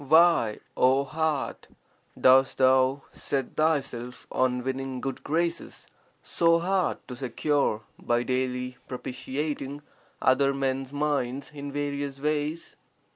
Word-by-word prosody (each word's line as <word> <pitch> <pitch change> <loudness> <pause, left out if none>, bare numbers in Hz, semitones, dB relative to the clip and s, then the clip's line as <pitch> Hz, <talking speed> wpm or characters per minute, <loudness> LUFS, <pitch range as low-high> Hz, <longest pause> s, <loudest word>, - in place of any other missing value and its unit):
Why, 160 -8 +5 0.2
O 130 +2 +4
heart, 155 -1 -2 0.5
dost 130 +1 +5
thou 130 +1 +4
set 135 -2 -3
thyself 135 -6 -1
on 125 -1 +1
winning 130 0 -3
good 135 0 -4
graces, 170 +2 -2 0.4
so 165 0 +3
hard 185 +2 +1
to 125 - -6
secure, 130 -2 0 0.2
by 120 0 +1
daily 125 0 -2
propitiating 140 +3 -4 0.4
other 135 +1 +3
men's 135 -1 -1
minds 140 -2 -1
in 145 -1 -6
various 140 -1 -3
ways? 150 +2 -2
135 Hz, 110 wpm, -27 LUFS, 130-150 Hz, 0.5 s, Why